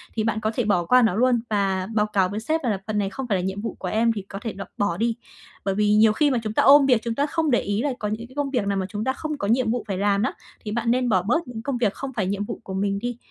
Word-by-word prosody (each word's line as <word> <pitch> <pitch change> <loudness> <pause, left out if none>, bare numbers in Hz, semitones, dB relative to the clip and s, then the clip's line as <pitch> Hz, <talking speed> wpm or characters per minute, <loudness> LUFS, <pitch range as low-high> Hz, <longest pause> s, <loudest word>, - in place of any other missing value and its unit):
thì 220 - 0
bạn 220 -1 0
có 220 0 -1
thể 245 - +1
bỏ 180 -5 +2
qua 250 +7 +5
nó 225 -6 +2
luôn 245 +1 +3
và 195 -3 0
báo 210 -1 +3
cáo 195 -3 +1
với 205 +2 -3
sếp 315 +8 -1
là 215 -6 0
"Phần 215 -1 -1
này 200 -2 0
không 260 +6 -6
phải 205 -5 +1
là - - -1
nhiệm 190 +2 -3
vụ 225 - -4
của 185 - -4
em, 225 +4 +2
thì 210 - -4
có 195 +1 -9
thể 225 -1 -4
độc 195 - -7
bỏ 185 -4 0
đi." 230 +2 0 0.5
Bởi 195 -1 0
vì 210 0 +3
nhiều 215 0 +5
khi 290 +5 +2
mà 255 - +1
chúng 215 -1 -3
ta - - +3
ôm 280 0 +8
việc, 250 -4 +3
chúng 230 -1 -2
ta 280 - +1
không 315 0 0
để 240 - +4
ý 205 +2 -1
là 290 - +1
có 210 - -2
những 220 +3 -4
cái 260 - -18
công 290 -1 -1
việc 240 -7 0
nào 200 -1 0
mà 190 - -1
chúng 205 +2 -4
ta 260 +2 0
không 305 +1 -4
có 200 - -3
nhiệm 230 +1 +2
vụ 245 -1 -2
phải 195 -3 -2
làm 200 0 +2
nó, 255 - 0 0.3
thì 210 - -3
bạn 230 +1 0
nên 250 0 +1
bỏ 190 -4 +3
bớt 265 - 0
những 235 -3 -6
công 265 +1 -2
việc 220 -4 +1
không 270 -1 -6
phải 210 -6 -1
nhiệm 200 +1 -2
vụ - - -6
của 190 - -7
mình 200 +1 -1
đi, 245 +2 -4
220 Hz, 340 wpm, -24 LUFS, 200-245 Hz, 0.5 s, ôm